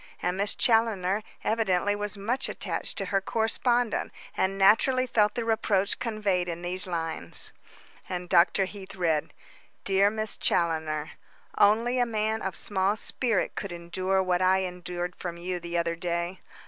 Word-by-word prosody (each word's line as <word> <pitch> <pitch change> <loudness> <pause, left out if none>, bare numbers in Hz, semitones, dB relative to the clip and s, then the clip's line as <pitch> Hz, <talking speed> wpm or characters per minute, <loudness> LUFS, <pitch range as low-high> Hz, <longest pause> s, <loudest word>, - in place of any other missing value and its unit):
And 180 +1 -1
Miss 200 +2 0
Challoner 215 -4 +2 0.2
evidently 205 -3 +1
was 205 0 -4
much 235 +7 -1
attached - - -3
to 195 - -1
her 195 - +3
correspondent, 230 +2 +1 0.2
and 190 +1 0
naturally 240 +6 +4
felt 210 -4 +2
the 235 -2 -2
reproach 215 -3 +1
conveyed 205 -6 0
in 170 +1 -5
these 180 +2 0
lines." 165 -2 -3 0.6
And 180 -1 -4
Dr. 180 +2 +4
Heath 195 0 -10
read: 165 -5 0 0.5
"Dear 195 +1 +4
Miss 215 0 -2
Challoner: 160 -3 0 0.4
"Only 230 +5 +3
a 245 - +2
man 220 0 -1
of 190 -2 -3
small 195 0 +1
spirit 225 -1 0
could 200 - -5
endure 185 +3 -1
what 180 -1 +1
I 190 +1 +4
endured 180 -1 -4
from 170 -2 -6
you 180 +1 -3
the 170 0 -4
other 170 0 0
day. 170 +1 -3
190 Hz, 150 wpm, -27 LUFS, 175-215 Hz, 0.6 s, naturally